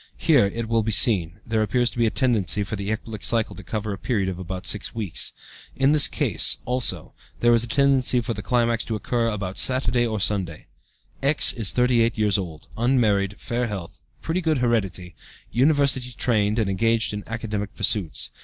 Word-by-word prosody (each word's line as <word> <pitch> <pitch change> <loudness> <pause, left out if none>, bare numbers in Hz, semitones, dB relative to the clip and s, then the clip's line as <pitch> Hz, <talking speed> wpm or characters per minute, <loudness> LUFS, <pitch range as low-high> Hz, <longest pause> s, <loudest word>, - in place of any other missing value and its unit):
Here, 145 -11 +3
it 115 +3 -5
will 115 0 +1
be 110 +1 -2
seen, 100 -5 +3
there 110 -1 0
appears 120 +3 +1
to - - -8
be 115 - +3
a - - +2
tendency 110 -5 +1
for 100 - -5
the 100 0 -5
ecbolic 110 -1 -5
cycle 115 -2 0
to - - -10
cover 105 +3 -4
a 95 - -8
period 100 -5 -1
of 90 -1 -6
about 95 0 -6
six 105 - -2
weeks. 105 -7 -2 0.4
In 135 +1 +3
this 150 -2 +6
case, - - 0
also, 125 0 -1 0.3
there 120 0 +4
is 115 0 +2
a - - -6
tendency 135 0 +3
for 115 0 -3
the 105 - -6
climax 115 +1 0
to 110 - -3
occur 115 +3 -1
about 100 -4 -4
Saturday 125 -2 +1
or 110 -2 -3
Sunday. 95 -6 -1 0.6
"X. 140 +2 +4
is 110 -6 0
38 120 -2 +2
years 105 -2 +2
old, 80 -5 -7
unmarried, 105 -5 +1
fair 120 +1 -2
health, 95 -6 -7 0.2
pretty 170 +3 -1
good 160 -3 +1
heredity; 95 -8 -1 0.4
university 135 -1 +2
trained, 110 -3 0
and 110 -3 +1
engaged 115 +3 +1
in 105 0 -5
academic 105 -3 -5
pursuits. 100 -5 -1
110 Hz, 190 wpm, -23 LUFS, 100-120 Hz, 0.6 s, this